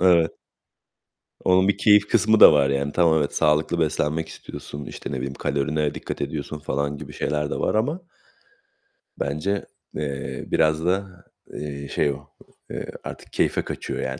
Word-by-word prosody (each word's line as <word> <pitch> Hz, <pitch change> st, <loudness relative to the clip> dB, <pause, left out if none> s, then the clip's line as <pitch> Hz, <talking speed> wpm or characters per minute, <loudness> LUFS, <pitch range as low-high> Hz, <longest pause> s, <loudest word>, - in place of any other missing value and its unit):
Evet. 85 Hz, -3 st, +5 dB, 1.1 s
Onun 95 Hz, +1 st, +4 dB
bir 100 Hz, -, +2 dB
keyif 105 Hz, -1 st, +5 dB
kısmı 110 Hz, +1 st, +3 dB
da -, -, +10 dB
var 70 Hz, -2 st, +4 dB
yani. 70 Hz, +1 st, 0 dB
Tamam 80 Hz, -1 st, +4 dB
evet 70 Hz, -, -2 dB
sağlıklı 75 Hz, +3 st, +2 dB
beslenmek 80 Hz, 0 st, 0 dB
istiyorsun, 70 Hz, -2 st, -8 dB
işte, -, -, -7 dB
ne 70 Hz, -, -2 dB
bileyim 65 Hz, +1 st, -3 dB
kalorine 75 Hz, +1 st, -1 dB
dikkat -, -, -5 dB
ediyorsun 75 Hz, 0 st, -4 dB
falan 70 Hz, 0 st, -2 dB
gibi 75 Hz, 0 st, -9 dB
şeyler 75 Hz, +1 st, -1 dB
de -, -, -2 dB
var -, -, 0 dB
ama. 145 Hz, +12 st, 0 dB, 1.2 s
Bence, 85 Hz, +8 st, -1 dB, 0.3 s
eee, 70 Hz, -3 st, -4 dB
biraz 80 Hz, +1 st, +2 dB
da, 95 Hz, 0 st, -1 dB, 0.3 s
eee, 70 Hz, -1 st, -5 dB
şey 75 Hz, +1 st, +1 dB
o, 70 Hz, 0 st, -9 dB, 0.4 s
eee, -, -, -4 dB, 0.2 s
artık -, -, -9 dB
keyfe -, -, +1 dB
kaçıyor -, -, -5 dB
yani. 65 Hz, 0 st, -3 dB
75 Hz, 155 wpm, -24 LUFS, 70-90 Hz, 1.2 s, da